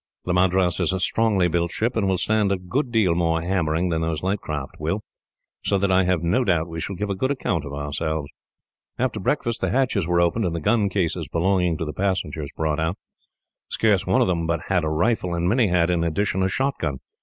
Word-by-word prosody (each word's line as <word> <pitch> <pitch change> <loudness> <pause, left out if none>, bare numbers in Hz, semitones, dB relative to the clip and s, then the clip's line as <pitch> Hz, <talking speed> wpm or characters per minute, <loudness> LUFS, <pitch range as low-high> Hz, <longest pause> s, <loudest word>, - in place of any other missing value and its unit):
The 90 - 0
Madras 90 -1 +2
is - - +1
a 95 - -1
strongly 100 -1 +2
built 85 0 0
ship, 115 +3 -1
and 105 -4 +1
will 95 -1 +1
stand 105 0 +1
a 100 - +1
good 120 +9 -2
deal 105 -7 +3
more 80 -1 +1
hammering 85 -1 0
than 80 -1 0
those 80 -1 -2
light 95 +2 0
craft 75 -3 -5
will, - - -2 0.6
so 100 - +2
that 100 0 +1
I 95 0 +4
have 90 -2 +1
no 90 +10 +2
doubt 85 -6 +1
we 80 -1 -6
shall 100 - -4
give 100 +3 -3
a - - -1
good 130 +8 -1
account 100 - -1
of 70 - -7
ourselves." 75 +1 -3 0.7
After 125 -3 -1
breakfast, 120 +2 -1
the - - +1
hatches 120 -9 +1
were 85 0 +2
opened 85 +6 +2
and 85 -2 -1
the - - -1
gun 105 +3 +2
cases 90 -4 -1
belonging 90 -1 +1
to 80 - -3
the 75 - -5
passengers 80 -5 -2
brought 80 -1 0
on 80 +2 0
deck. - - -20 0.7
Scarce 105 -5 +1
one 95 - +3
of - - +3
them 85 -3 0
but 85 0 0
had 90 -3 +2
a 80 - 0
rifle, 90 +2 0
and 85 +1 0
many 115 +3 +3
had, 90 -1 +2
in 85 -1 +1
addition, 95 +3 0
a 95 - +2
shotgun. 95 - -1
90 Hz, 230 wpm, -23 LUFS, 80-100 Hz, 0.7 s, I